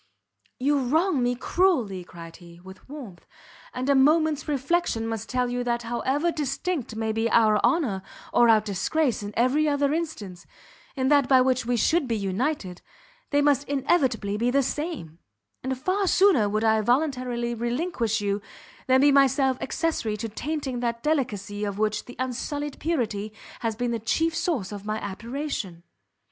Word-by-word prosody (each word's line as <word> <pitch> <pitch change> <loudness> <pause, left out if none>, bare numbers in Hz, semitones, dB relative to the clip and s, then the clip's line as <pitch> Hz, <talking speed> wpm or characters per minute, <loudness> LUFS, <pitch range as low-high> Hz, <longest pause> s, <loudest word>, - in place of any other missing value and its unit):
"You 285 +2 +2
wrong 305 +4 +1
me 245 0 +1
cruelly," 245 - +1
cried 170 -1 -11
he, 170 -1 -15
with 190 +5 -14
warmth, 250 - -10 0.4
"and 255 +1 -4
a 280 - +4
moment's 305 +3 +3
reflection 285 -4 0
must 225 -1 -4
tell 250 -1 0
you 245 0 -2
that 235 -1 -1
however 265 +8 0
distinct 290 -3 -3
may 220 0 -1
be 225 +1 0
our 215 -2 +4
honour 260 - +1 0.3
or 240 -1 +5
our 220 -1 +6
disgrace 220 - 0
in 205 0 -5
every 275 +6 +3
other 285 0 +1
instance, 220 - -5 0.5
in 260 -1 0
that 285 -3 +4
by 260 -2 +6
which 255 -2 +1
we 245 0 +1
should 315 +5 +2
be 230 -2 0
united, 200 - -2 0.5
they 290 0 +2
must 285 -1 +2
inevitably 260 -8 +1
be 235 +3 +1
the 275 +2 +2
same; 270 - -4 0.4
and 260 0 -3
far 375 +8 0
sooner 360 - +4
would 215 +2 -1
I 220 -1 +3
voluntarily 245 -1 0
relinquish 235 - -1
you, 200 0 -1 0.5
than 260 0 +5
be 290 +1 +6
myself 270 -1 +3
accessory 265 -9 -1
to 225 +2 -4
tainting 275 +1 -3
that 235 -1 -2
delicacy 210 -9 -1
of 200 -1 -3
which 215 0 0
the 245 - -11
unsullied 270 +3 -4
purity 220 -10 -2 0.3
has 225 -2 -2
been 245 +2 -2
the 230 - -1
chief 325 +9 0
source 285 - -1
of 205 -1 -7
my 215 +1 -2
admiration." 215 - -5
245 Hz, 165 wpm, -25 LUFS, 215-290 Hz, 0.5 s, our